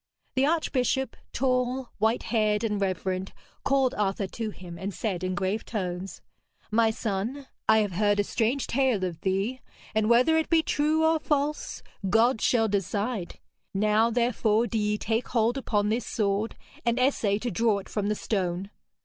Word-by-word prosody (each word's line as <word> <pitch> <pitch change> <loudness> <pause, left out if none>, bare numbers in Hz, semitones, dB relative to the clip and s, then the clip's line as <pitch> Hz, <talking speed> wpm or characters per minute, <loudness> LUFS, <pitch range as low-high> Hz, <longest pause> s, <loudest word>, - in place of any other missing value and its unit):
The 265 +1 +3
archbishop, 265 -5 0 0.2
tall, 255 0 0
white 220 +3 +2
haired 215 -1 +2
and 210 -3 -1
reverend, 185 0 -2 0.3
called 270 -2 +2
Arthur 200 -1 0
to 220 +3 -4
him 175 -4 -10
and 195 +1 -3
said 190 -3 -3
in 185 0 -1
grave 195 +3 -1
tones: 185 -3 -4 0.5
'My 225 +1 +4
son, 220 +5 -3 0.2
I 220 - +7
have 205 - -3
heard 205 +3 +2
a - - +4
strange 240 +6 0
tale 255 -6 +1
of 170 -3 -3
thee, 200 +7 -1 0.3
and 215 0 +2
whether 250 +7 +5
it 320 - 0
be 325 -1 +4
true 310 +2 +2
or 320 0 +3
false, 295 0 -1 0.3
God 225 +3 +3
shall 225 -3 +3
decide. 200 0 -2 0.4
Now, 215 +3 +3
therefore, 235 -1 +2
do 225 -1 -1
ye 210 0 +1
take 225 +3 -1
hold 230 +1 +1
upon 210 -6 0
this 230 +2 -1
sword 205 +1 0 0.3
and 235 0 +1
essay 235 -6 +2
to 240 +2 -3
draw 225 -2 +2
it 195 - -7
from 205 -1 -2
the 210 - +1
stone.' 190 -2 -2
220 Hz, 165 wpm, -27 LUFS, 200-250 Hz, 0.5 s, I